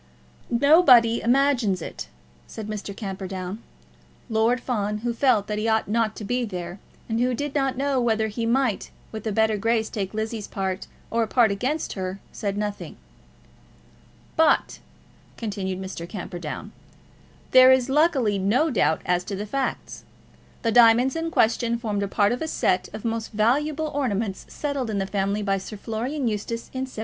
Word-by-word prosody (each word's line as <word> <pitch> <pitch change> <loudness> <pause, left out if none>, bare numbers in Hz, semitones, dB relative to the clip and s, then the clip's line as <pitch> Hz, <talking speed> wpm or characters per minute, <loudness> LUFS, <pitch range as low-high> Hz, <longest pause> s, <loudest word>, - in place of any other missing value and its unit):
"Nobody 250 -3 +6
imagines 245 -6 +2
it," - - -7 0.4
said 220 - -7
Mr. 210 -2 -6
Camperdown. 190 0 -5 0.7
Lord 225 +3 +2
Fawn, 210 -4 -2
who 240 - 0
felt 230 -4 +3
that 210 0 -3
he 220 - -1
ought 220 0 +2
not 220 0 0
to - - -7
be 245 +4 -1
there, 180 -3 -5 0.3
and 225 0 -1
who 250 0 +1
did 290 +3 -3
not 270 -3 0
know 275 -1 +1
whether 220 -2 +1
he 230 +2 -3
might 245 -3 +1 0.2
with 220 0 -6
a - - 0
better 220 +1 +2
grace 225 +1 0
take 200 -2 -4
Lizzie's 220 -1 -3
part 190 -1 -3 0.2
or 230 - +1
a 225 - +1
part 230 -1 +4
against 260 +10 -2
her, 190 0 -4
said 200 -2 -3
nothing. 205 -1 -4 1.4
"But," 320 -2 +3 0.6
continued 195 -4 -3
Mr. 185 -3 -6
Camperdown, 175 0 -6 0.8
"there 255 0 +8
is 260 -1 +4
luckily 270 - +2
no 250 +12 +2
doubt 160 -9 +1
as 180 0 +1
to 200 - -4
the 205 +2 -4
facts. 270 +5 -3 0.6
The 230 - +2
diamonds 240 +4 +5
in 325 0 -2
question 235 -4 +2
formed 215 -4 -2
a 200 - -1
part 205 +1 +2
of 245 - -2
a 320 - -2
set 185 -10 0
of 215 +2 -8
most 225 0 -3
valuable 295 +8 +1
ornaments 220 -8 -2
settled 280 -5 -3
in 210 - -1
the 195 - 0
family 200 +1 -1
by 195 -1 +1
Sir 210 +3 -8
Florian 240 +7 -3
Eustace 225 +2 -3
in 260 0 -3
1799. - - -15
225 Hz, 170 wpm, -24 LUFS, 200-250 Hz, 1.4 s, there